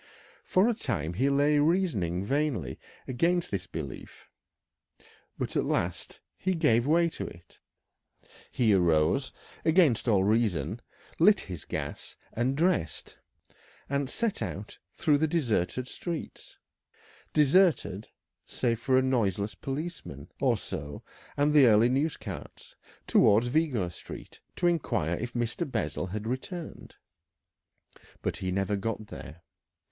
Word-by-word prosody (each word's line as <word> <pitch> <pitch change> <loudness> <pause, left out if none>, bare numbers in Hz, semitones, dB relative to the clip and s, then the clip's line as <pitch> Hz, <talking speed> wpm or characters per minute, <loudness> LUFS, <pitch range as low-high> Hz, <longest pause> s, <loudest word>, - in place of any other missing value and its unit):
For 185 +4 +3
a 240 - +3
time 100 - -2
he 130 +10 +1
lay 145 +1 +3
reasoning 135 - +1
vainly 145 +1 -1 0.3
against 170 +7 +1
this 95 -3 -3
belief, 70 -7 -8 1.1
but - - -3
at - - +2
last - - -2 0.2
he 185 0 0
gave 125 -7 +3
way 170 +2 +4
to - - -5
it. 85 0 -14 0.9
He 115 -4 +3
arose, 85 - +2 0.3
against 160 - +3
all 100 -5 +4
reason, 105 - +1 0.4
lit 200 +4 +6
his 90 -6 -8
gas, - - -5 0.2
and 130 +4 0
dressed, 125 - 0 0.7
and 140 -1 -1
set 230 +4 -1
out 105 +2 -5 0.2
through 145 -2 +2
the 160 - +2
deserted 130 - 0
streets 170 +3 -6 0.7
deserted, 150 - +3 0.3
save 115 -2 -1
for 130 +1 +2
a 130 - +4
noiseless 105 -6 0
policeman 140 - -6
or - - +2
so 70 0 -6 0.3
and 145 +1 +3
the 145 -4 +7
early 110 +2 +5
news 145 +5 0
carts - - -9 0.3
towards 110 +4 +5
Vigo 125 - +1
Street 85 - -10 0.2
to 175 - -1
inquire 120 - +1
if 120 +2 -5
Mr. 120 +6 -2
Bessel 110 -5 -2
had 105 +3 -5
returned. 155 - -6 1.3
But - - -1
he 95 -2 -3
never 100 +2 0
got 110 +1 -3
there. 85 -4 -10
125 Hz, 125 wpm, -29 LUFS, 100-155 Hz, 1.3 s, the